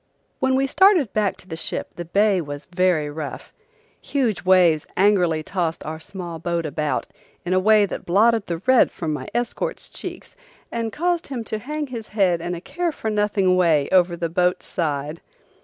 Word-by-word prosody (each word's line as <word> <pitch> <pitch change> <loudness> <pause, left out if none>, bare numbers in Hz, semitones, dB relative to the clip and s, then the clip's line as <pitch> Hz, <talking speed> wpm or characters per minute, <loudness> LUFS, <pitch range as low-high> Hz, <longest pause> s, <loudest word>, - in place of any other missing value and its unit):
When 260 0 +2
we 270 +1 +2
started 345 - +4
back 210 -2 0
to - - -14
the 160 - -5
ship 160 - -3
the 175 - -6
bay 200 +2 +2
was 145 -2 -7
very 180 -3 +1
rough. 150 -1 -7 0.5
Huge 235 - -1
waves 180 -4 +4
angrily 180 -6 +3
tossed 170 -2 -2
our 160 +1 -5
small 170 0 -7
boat 170 0 -2
about 150 0 -1 0.4
in 180 - 0
a 185 - +4
way 210 +1 +5
that - - -6
blotted 215 +4 +3
the 170 - -2
red 260 -1 +5
from 160 -3 -3
my 150 - -5
escort's 240 0 -3
checks - - -7 0.4
and 230 -1 -2
caused 345 - -1
him 255 -4 -4
to 220 -1 -4
hang 300 +6 -4
his 235 -5 -7
head 185 -5 +1
in 175 +1 -3
a 170 - -8
care 350 - -2
for 220 -7 -4
nothing 205 -3 +2
way 160 -6 +3
over 175 -2 +3
the 170 - -1
boat's 180 +2 0
side. 150 -1 -3
185 Hz, 185 wpm, -22 LUFS, 165-225 Hz, 0.5 s, way